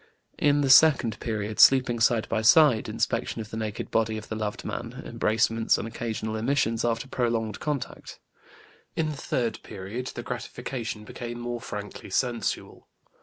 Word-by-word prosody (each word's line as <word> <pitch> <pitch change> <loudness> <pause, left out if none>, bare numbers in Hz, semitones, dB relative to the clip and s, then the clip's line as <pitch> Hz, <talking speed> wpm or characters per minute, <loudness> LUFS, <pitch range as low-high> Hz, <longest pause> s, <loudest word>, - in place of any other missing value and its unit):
In 145 0 +3
the 140 - +1
second 130 -7 +6
period 110 -2 -3
sleeping 130 -3 +6
side 115 -1 +3
by 110 -1 0
side, 125 +1 +5
inspection - - -1
of 110 -1 -7
the - - -5
naked 110 -2 -4
body 110 -1 +1
of 110 - -9
the 110 - -3
loved 105 -1 -4
man, - - -5
embracements, 115 +1 +1
and - - -4
occasional 110 -1 -4
emissions 115 -1 0
after 115 +2 -1
prolonged 115 -4 -1
contact. 145 -3 -5 0.8
In 155 -1 0
the - - -5
third 120 -4 -2
period 105 +5 -6
the - - -5
gratification 115 -4 -5
became 120 +3 -7
more 120 0 -4
frankly 105 -1 -7
sensual. 120 +4 -2
115 Hz, 155 wpm, -26 LUFS, 110-125 Hz, 0.8 s, second